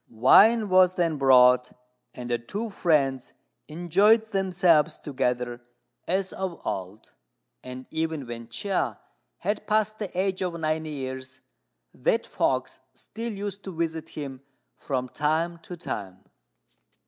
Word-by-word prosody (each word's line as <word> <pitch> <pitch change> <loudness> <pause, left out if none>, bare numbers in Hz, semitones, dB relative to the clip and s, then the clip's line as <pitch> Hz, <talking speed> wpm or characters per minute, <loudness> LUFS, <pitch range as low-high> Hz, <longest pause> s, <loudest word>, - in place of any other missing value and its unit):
Wine 210 - +6
was 185 0 +5
then 165 -3 0
brought, 125 -2 +5 0.4
and 120 -1 -7
the 120 - +1
two 205 - -5
friends 140 -9 +1 0.3
enjoyed 190 +8 +3
themselves 175 -5 +3
together 125 -3 -2 0.5
as 190 +1 -1
of 190 -3 -4
old; 95 +3 -5 0.5
and 130 0 -8
even 160 -3 -2
when 115 -1 -7
Chia 190 - -2 0.4
had 205 +1 -3
passed 215 0 +1
the 205 -3 -3
age 190 0 0
of 175 -2 -2
ninety 155 0 -1
years, 130 -2 -6 0.5
that - - 0
fox 130 -1 -1 0.2
still 230 - -6
used 200 -1 -6
to 190 -3 -7
visit 160 -1 -3
him 135 -3 -6 0.3
from 130 -2 -3
time 160 +5 -1
to 175 +2 -9
time. 95 - -6
160 Hz, 125 wpm, -26 LUFS, 130-190 Hz, 0.5 s, Wine